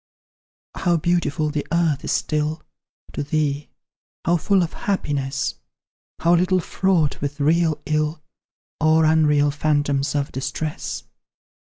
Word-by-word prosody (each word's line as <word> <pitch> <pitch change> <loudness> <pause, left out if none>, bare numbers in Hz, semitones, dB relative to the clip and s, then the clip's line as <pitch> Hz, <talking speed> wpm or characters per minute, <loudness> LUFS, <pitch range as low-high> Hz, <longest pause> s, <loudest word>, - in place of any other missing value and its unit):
How 175 -2 +2
beautiful 155 -2 0
the 150 -1 -3
earth 165 -4 +1
is - - -2
still, 155 +1 -1 0.5
To - - -3
thee 145 0 -1 0.6
how 170 - +3
full 190 +2 +2
of 165 - -4 0.2
happiness? 140 -7 -1 0.7
How 170 +1 +4
little 185 +2 +3
fraught 175 -3 0
with 145 +1 -3
real 160 +1 +2
ill, 155 +1 -1 0.6
Or 160 0 +4
unreal 150 -2 +4
phantoms 145 -1 0
of 140 -1 -1
distress! 140 +3 -4
155 Hz, 115 wpm, -22 LUFS, 145-170 Hz, 0.7 s, How